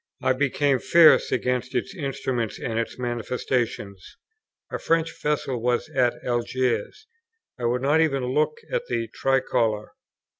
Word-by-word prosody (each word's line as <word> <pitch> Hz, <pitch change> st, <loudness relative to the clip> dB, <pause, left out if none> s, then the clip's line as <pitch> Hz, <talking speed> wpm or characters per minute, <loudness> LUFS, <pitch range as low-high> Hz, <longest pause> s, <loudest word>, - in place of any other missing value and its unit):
I 130 Hz, -, +3 dB
became 140 Hz, 0 st, +1 dB
fierce 165 Hz, +3 st, +6 dB
against 125 Hz, +1 st, -1 dB
its 125 Hz, -, -1 dB
instruments 130 Hz, -, -3 dB
and 115 Hz, 0 st, -2 dB
its 115 Hz, -, -4 dB
manifestations. 120 Hz, -4 st, -3 dB, 0.5 s
A -, -, -3 dB
French 165 Hz, 0 st, +1 dB
vessel 140 Hz, -5 st, -1 dB
was 120 Hz, 0 st, 0 dB
at 125 Hz, -2 st, +2 dB
Algiers; 120 Hz, -, -1 dB, 0.5 s
I 120 Hz, -, -2 dB
would 125 Hz, +2 st, 0 dB
not 150 Hz, +4 st, +4 dB
even 140 Hz, -5 st, +1 dB
look 150 Hz, -, 0 dB, 0.2 s
at -, -, -1 dB
the 115 Hz, -1 st, -2 dB
tricolour. 115 Hz, -5 st, 0 dB
125 Hz, 135 wpm, -24 LUFS, 120-145 Hz, 0.5 s, fierce